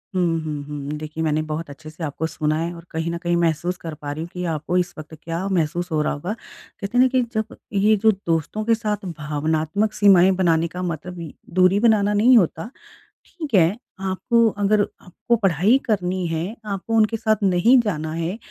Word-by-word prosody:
हुँ, 170 -3 +1
हुँ, 150 -2 -4
हुँ। 145 -1 -6
देखिए 155 +1 -5
मैंने 155 0 +1
बहुत 155 +1 -4
अच्छे 155 +2 -10
से 160 +2 -9
आपको 155 +1 -2
सुना 155 -1 -1
है 170 +1 -2
और 170 0 -12
कहीं 160 +1 -2
न 170 - -3
कहीं 175 0 +1
महसूस 170 +2 0
कर 165 -3 -7
पा 145 -1 -6
रही 155 +2 -5
हूँ 170 - -8
कि 180 - -4
आपको 160 +4 -1
इस 180 -1 0
वक़्त 155 +1 -10
क्या 170 +4 -3
महसूस 175 0 -1
हो 155 -1 +1
रहा - - 0
होगा। 175 +8 -4
कहते 225 0 -8
हैं - - +5
ना - - +5
कि 260 0 +1
एक 245 - 0
जब 220 0 -3 0.2
ये 210 +2 +4
जो 220 - +7
दोस्तों 165 +6 -1
के 230 0 +4
साथ 210 -3 -3
भावनात्मक 155 +7 -1
सीमाएँ 190 -3 +6
बनाने 170 -3 +2
का 180 +2 -7
मतलब 170 -1 -5 0.2
दूरी 185 +2 +4
बनाना 210 -2 +3
नहीं 235 +4 +6
होता। 165 0 +1 0.6
ठीक 310 -7 -8
है, 180 +1 +4 0.2
आपको 225 +5 +2
अगर 205 +1 +3 0.2
आपको 235 +6 -1
पढ़ाई 195 - +3
करनी 185 -4 -1
है, 165 +6 -3
आपको 200 +2 -4
उनके 220 +1 +3
साथ 220 0 +2
नहीं 200 +7 +5
जाना 160 -8 -3
है, 170 +5 -3
180 Hz, 205 wpm, -22 LUFS, 160-210 Hz, 0.6 s, जो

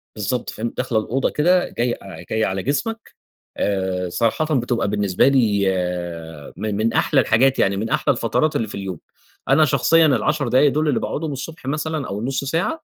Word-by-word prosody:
بالضبط، 110 +3 -2
فاهم. 115 +2 -4
داخلة 120 -3 0
الأوضة 130 +5 -1
كده، 180 +4 +2
جاي 120 0 -1
أ 95 -1 -10
جاية 110 0 +1
على 95 0 -2
جسمك، 225 - -3 0.4
آآ 95 -2 -1
صراحةً 130 - 0
بتبقى 120 -2 -1
بالنسبة 100 -1 +2
لي 110 -7 +3 0.9
من 110 -1 -2
من 115 +2 0
أحلى 140 - +3
الحاجات 130 +4 +3
يعني، 100 0 +2
من 110 +3 -3
أحلى 140 - +2
الفترات 120 +6 0
اللي 110 - 0
في - - -8
اليوم، 95 -4 -5 0.5
أنا 155 +3 +5
شخصيًا 160 +4 +4
ال10 135 +1 +2
دوُل 155 +2 0
اللي 140 - +1
باقعدهم 155 0 -3
الصبح 145 +3 -7
مثلًا 150 +1 -2
أو 100 - -4
النُص 130 +5 -2
ساعة، 170 - -2
125 Hz, 175 wpm, -21 LUFS, 105-150 Hz, 0.9 s, أنا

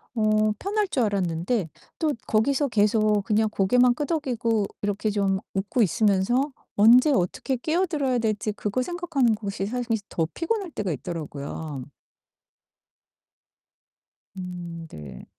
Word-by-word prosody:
어 215 -1 +3
편할 410 +1 0
줄 255 - +1
알았는데 185 -1 0 0.3
또 310 -3 +1
거기서 275 +6 +2
계속 210 -1 +3
그냥 220 0 +2
고개만 245 +5 +3
끄덕이고 245 -9 0 0.2
이렇게 205 +1 -1
좀 195 -2 +1
웃고 200 +5 0
있으면서 215 - +2 0.2
언제 245 +8 +7
어떻게 255 +4 0
끼어들어야 305 -3 0
될지 215 -1 -1
그거 210 +4 -2
생각하는 320 -7 +1
곳이 200 -2 -4
사실 240 0 -1
더 165 - 0
피곤할 380 0 -2
때가 200 -8 -2
있더라고요. 150 -3 -5 2.5
음 175 -2 -7
네. 75 -3 -10
215 Hz, 265 characters per minute, -25 LUFS, 195-255 Hz, 2.5 s, 언제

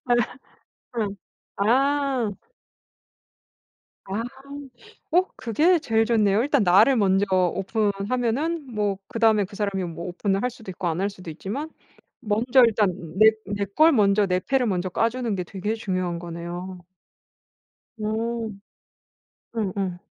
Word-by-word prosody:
아. 245 - +3 0.8
응. 205 -2 -2 0.4
아. 265 +1 +2 1.7
아. 200 +4 -3 0.9
어 355 +3 +5
그게 310 - +2
제일 225 -6 +1
좋네요. 215 -3 +3
일단 285 -5 +2
나를 205 +9 +5
먼저 195 -2 +3
오픈하면은 225 - 0
뭐 205 -2 0
그 230 - -6
다음에 220 -3 +4
그 200 - -13
사람이 200 -2 -1
뭐 170 - -7
오픈을 195 +2 -1
할 250 - +1
수도 225 -5 -10
있고 180 0 -4
안 165 +3 -1
할 200 - +1
수도 185 -4 -10
있지만 210 - -5 0.5
먼저 240 +5 +3
일단 210 -4 +2 0.3
내 220 0 +8 0.2
내 205 0 -2
걸 310 - +4
먼저 205 -3 +3
내 180 0 +1
패를 265 +4 +1
먼저 185 -3 -1
까주는 230 +2 0
게 180 - -3
되게 200 +4 -3
중요한 185 -5 -2
거네요. 175 +1 -7 1.2
음. 220 -1 -3 1.0
응응. 190 -3 -2
210 Hz, 230 characters per minute, -24 LUFS, 190-235 Hz, 1.7 s, 내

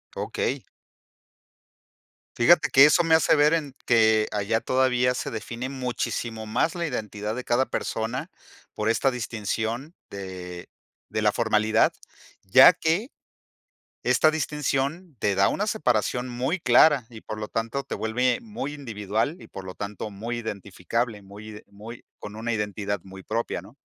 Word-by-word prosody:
Okey. - - -2 1.7
Fíjate 155 +8 +5
que 135 +2 +8
eso 160 +4 +5
me 165 -1 +2
hace 160 - +5
ver 150 +1 +4
en 145 -5 -2
que 110 -2 +4
allá 105 +2 0
todavía 125 -1 +2
se - - -4
define 115 +3 -5
muchísimo 120 -4 -3
más 125 - 0
la 170 -2 -2
identidad 105 -4 -4
de 125 - -5
cada 125 +2 +2
persona 125 +11 -3 0.4
por 105 +1 -1
esta 130 +4 +2
distinción 115 - -3 0.2
de 90 -2 -8 0.4
de 110 - -2
la 105 -1 +3
formalidad, 110 -1 +2 0.5
ya 115 - +8
que, 175 - -1 0.9
esta 155 - +4
distinción 150 +1 -2
te 100 - +1
da 95 +1 +4
una 205 - -1
separación 125 - 0
muy 130 +9 -2
clara 125 0 +5
y 115 -3 -12
por 110 - -6
lo 105 - -4
tanto, 115 +5 -3
te 135 - -5
vuelve 125 +3 0
muy 180 -10 -5
individual 115 - -2
y - - -12
por 95 - -9
lo 95 0 -8
tanto, 105 +1 -6
muy 115 +4 -5
identificable, 105 +1 -3
muy 100 +2 -12
ide 105 -1 -10
muy 110 +4 -11
con 105 +1 -9
una 115 +1 -3
identidad 105 -2 -2
muy 95 0 -12
propia, 110 -4 -3
¿no? 105 +7 -16
115 Hz, 150 wpm, -25 LUFS, 105-135 Hz, 1.7 s, que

